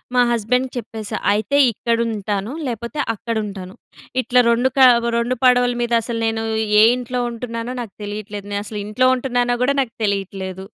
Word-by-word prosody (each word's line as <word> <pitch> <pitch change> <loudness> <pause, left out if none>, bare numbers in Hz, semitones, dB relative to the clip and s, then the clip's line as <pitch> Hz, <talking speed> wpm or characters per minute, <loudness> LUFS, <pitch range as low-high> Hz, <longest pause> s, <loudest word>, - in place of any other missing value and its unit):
మా 250 - +5
హస్బెండ్‌కి 250 +3 0
చెప్పేశా, 220 -2 -5 0.2
"అయితే 215 +7 0
ఇక్కడుంటాను, 220 -1 -2
లేపోతే 235 +4 -5
అక్కడుంటాను. 205 -4 -5 0.5
ఇట్లా 250 0 +3
రొండు 240 +3 +3
కా 260 -1 +8 0.3
రొండు 240 +2 0
పడవల 245 -1 +4
మీదసలు 235 -1 0
నేనూ 225 0 -1 0.4
ఏ - - +8
ఇంట్లో 250 0 -4
ఉంటున్నానో 230 +1 -5
నాకు 220 -5 -8
తెలీట్లేదు. 205 0 -6
నే - - 0
అసలు 210 0 -6
ఇంట్లో 215 +5 +1
ఉంటున్నానో 245 -1 0
గూడా 280 +2 +2
నాకు 245 -4 -4
తెలీట్లేదు." 195 -2 -3
230 Hz, 145 wpm, -20 LUFS, 210-245 Hz, 0.5 s, కా